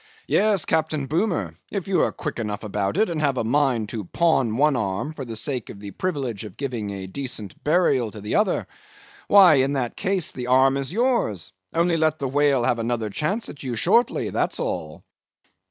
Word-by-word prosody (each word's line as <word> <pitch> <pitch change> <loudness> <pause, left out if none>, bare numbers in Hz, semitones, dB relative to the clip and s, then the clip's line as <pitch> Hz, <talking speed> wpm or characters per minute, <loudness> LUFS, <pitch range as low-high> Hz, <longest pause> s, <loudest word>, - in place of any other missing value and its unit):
Yes, 205 -4 +2
Captain 155 -3 0
Boomer, 160 - -1 0.2
if 195 -3 -4
you 195 - +2
are - - +2
quick 150 -6 -5
enough 105 -2 -4
about 105 - -2
it, 220 +2 +3
and 165 -3 -3
have 140 -3 +1
a - - 0
mind 120 -3 +1
to 110 -3 -4
pawn 125 - +1
one 150 +1 +3
arm 105 +6 -2
for 140 -4 -6
the 115 -2 -6
sake 125 +1 -2
of 100 - -9
the 100 -1 -8
privilege 135 - -3
of 105 -4 -10
giving 105 -8 -4
decent 115 -8 -5
burial 150 -7 +2
to 105 - -10
the 105 +1 -4
other, - - +1 0.6
why 185 -7 +7
in 135 +2 +2
that 125 -4 -2
case 190 -4 0
the 125 -1 -6
arm 130 +1 +4
is 140 +1 -2
yours; 225 - 0 0.2
only 170 0 +2
let 155 -1 +2
the 140 - -2
whale 140 -1 +2
have 120 0 +1
another 115 -2 -2
chance 195 - -1
at 145 - -9
you 125 -3 -3
shortly, 205 - +2
that's - - -1
all." - - -4
135 Hz, 195 wpm, -23 LUFS, 115-160 Hz, 0.6 s, why